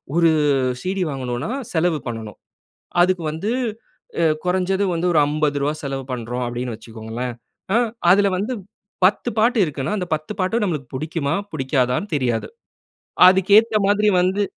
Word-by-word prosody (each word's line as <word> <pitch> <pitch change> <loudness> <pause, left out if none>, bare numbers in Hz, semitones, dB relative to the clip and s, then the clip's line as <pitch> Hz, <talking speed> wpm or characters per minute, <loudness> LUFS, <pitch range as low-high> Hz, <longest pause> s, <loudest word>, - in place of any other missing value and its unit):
ஒரு 165 -1 +5 0.5
CD 190 +1 -2
வாங்கணுனா, 130 - -3 0.2
செலவு 160 -2 +1
பண்ணணும். 110 -3 -7 0.6
அதுக்கு 180 -2 +1
வந்து 195 +8 -3 0.7
அ - - +4 0.2
குறஞ்சது 190 +2 +1
வந்து 170 +2 -1
ஒரு 155 - +5
ரூ.50 145 -1 0
செலவு 135 -1 -3
பண்றோம் 125 +1 -4
அப்பிடின்ணு 120 0 -4
வச்சுக்கோங்களேன். 115 +2 -6 0.4
ஆ - - +5 0.3
அதில 200 +1 +5
வந்து 215 +7 -2 0.5
10 195 - +2
பாட்டு 235 +2 +3
இருக்குன்னா, 150 +5 -3
அந்த 180 -2 -3
10 155 +7 -7
பாட்டு 215 +5 +1
நம்மளுக:கு 150 -8 -3
புடிக்குமா? 155 0 -2 0.2
புடிக்காதான்னு 130 +4 0
தெரியாது. 120 -5 0 0.8
அதுக்கு 190 +1 +2
ஏத்த 225 -1 +2
மாதிரி 210 +1 +3
வந்து 190 +3 +1
155 Hz, 135 wpm, -21 LUFS, 125-190 Hz, 0.8 s, ஒரு